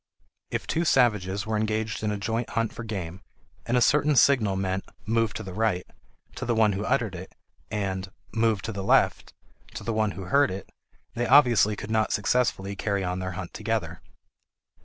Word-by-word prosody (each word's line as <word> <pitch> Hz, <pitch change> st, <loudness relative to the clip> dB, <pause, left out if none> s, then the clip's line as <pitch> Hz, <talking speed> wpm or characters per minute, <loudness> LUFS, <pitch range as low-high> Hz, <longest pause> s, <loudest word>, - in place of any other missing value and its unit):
If -, -, -3 dB
two 165 Hz, -, 0 dB
savages 105 Hz, -, +2 dB
were 110 Hz, 0 st, -1 dB
engaged 110 Hz, +1 st, -1 dB
in 105 Hz, -, -1 dB
a 105 Hz, -, -1 dB
joint 115 Hz, +4 st, -2 dB
hunt 115 Hz, -1 st, -1 dB
for -, -, -7 dB
game, 95 Hz, -5 st, -5 dB, 0.5 s
and 120 Hz, +1 st, +2 dB
a -, -, +3 dB
certain 150 Hz, +3 st, +3 dB
signal 120 Hz, -7 st, +4 dB
meant 95 Hz, 0 st, -1 dB, 0.2 s
"move 115 Hz, -1 st, +1 dB
to -, -, -4 dB
the 95 Hz, -, -7 dB
right" 105 Hz, -3 st, 0 dB, 0.5 s
to -, -, -4 dB
the 120 Hz, -, 0 dB
one 110 Hz, -2 st, +4 dB
who 100 Hz, +2 st, -3 dB
uttered 115 Hz, -5 st, 0 dB
it, 95 Hz, +1 st, -9 dB, 0.3 s
and 95 Hz, -3 st, -3 dB, 0.2 s
"move 110 Hz, -3 st, +1 dB
to 115 Hz, -, -3 dB
the 100 Hz, -2 st, -5 dB
left" -, -, +2 dB, 0.4 s
to -, -, -6 dB
the 115 Hz, -, -2 dB
one 110 Hz, -1 st, +1 dB
who 95 Hz, -, -7 dB
heard 140 Hz, +9 st, +3 dB
it, 95 Hz, 0 st, -6 dB, 0.5 s
they 120 Hz, +1 st, -1 dB
obviously 120 Hz, -6 st, +5 dB
could 105 Hz, +2 st, -7 dB
not 110 Hz, -1 st, +1 dB
successfully 105 Hz, -3 st, 0 dB
carry 100 Hz, 0 st, -1 dB
on 90 Hz, 0 st, -2 dB
their 95 Hz, 0 st, -4 dB
hunt 90 Hz, 0 st, -7 dB
together. -, -, -3 dB
110 Hz, 190 wpm, -26 LUFS, 95-115 Hz, 0.5 s, obviously